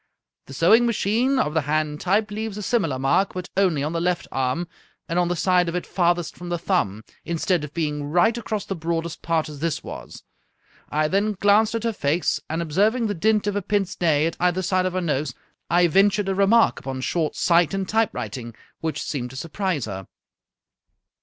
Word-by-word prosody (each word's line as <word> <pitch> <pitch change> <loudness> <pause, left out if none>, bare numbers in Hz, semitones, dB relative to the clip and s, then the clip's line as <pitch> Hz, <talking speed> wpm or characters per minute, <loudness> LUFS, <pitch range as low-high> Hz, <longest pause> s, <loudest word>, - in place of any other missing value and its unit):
The 135 - -9
sewing 220 - +5
machine, 235 +4 +1
of 150 -11 +1
the 160 - +2
hand 150 +1 -1
type, 205 +3 +1
leaves 215 0 -4
a 210 - -5
similar 185 - 0
mark, 135 +10 +1
but 180 -1 -4
only 180 -7 +2
on 155 +3 -2
the 165 - -1
left 175 0 0
arm, 135 +6 -1 0.4
and 170 +2 0
on 175 - +2
the 175 - 0
side 180 0 +2
of 170 - -4
it 180 - -2
farthest 175 -2 0
from 175 0 -8
the 175 - -1
thumb, 140 - -1 0.2
instead 170 0 0
of 150 - -6
being 150 -3 -2
right 180 +10 +3
across 215 -3 -3
the - - -3
broadest 165 0 -3
part, 165 -1 0
as 150 -2 -9
this 165 0 -2
was. - - -9 0.7
I 155 +1 +1
then 200 +5 +1
glanced 205 +3 +3
at 230 - -2
her 230 -1 0
face, 160 -1 0
and 160 +2 -1
observing 210 +9 +1
the 210 - 0
dint 210 +4 +1
of 205 -1 -1
a 205 - 0
pince 195 0 -1
nez 160 -2 +3
at - - -11
either 180 +1 +1
side 185 +1 +1
of 185 - -4
her 185 - -1
nose, 145 -5 -1 0.3
I 175 +1 +4
ventured 195 +3 +3
a - - +1
remark 200 +4 +4
upon 130 -1 -5
short 160 +3 -1
sight 170 -2 +3
and 195 -1 -2
typewriting, 135 - -2 0.2
which 160 -1 -3
seemed 125 -4 -3
to 130 - -12
surprise 165 - -2
her." 95 -3 -7
175 Hz, 205 wpm, -23 LUFS, 155-200 Hz, 0.7 s, sewing